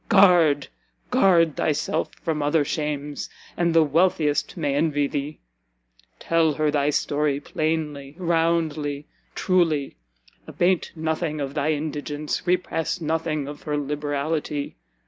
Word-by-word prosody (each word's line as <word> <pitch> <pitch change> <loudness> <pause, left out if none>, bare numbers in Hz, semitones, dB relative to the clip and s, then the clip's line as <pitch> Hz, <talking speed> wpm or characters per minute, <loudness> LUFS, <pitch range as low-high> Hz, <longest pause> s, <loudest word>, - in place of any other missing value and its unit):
Guard, 175 -9 +5 0.4
guard 175 - +4
thyself 155 +1 0
from 155 -2 -1
other 145 +1 +2
shames, 150 -1 -3 0.3
and 170 -1 +1
the 165 -1 +5
wealthiest 155 0 +1
may 145 -4 0
envy 145 0 +1
thee! 145 +2 -4 0.8
Tell 165 -2 +2
her 150 0 +1
thy 145 -1 +1
story, 145 -1 0
plainly, 150 -2 -3
roundly, 165 -4 0 0.3
truly; 165 -7 +1 0.5
abate 180 0 +1
nothing 160 -1 -2
of 140 -1 -3
thy 150 +1 +1
indigence, 150 0 -4
repress 175 -1 0
nothing 155 -2 -1
of 145 0 -8
her 150 -1 -2
liberality. 145 +1 -2
155 Hz, 115 wpm, -24 LUFS, 145-165 Hz, 0.8 s, Guard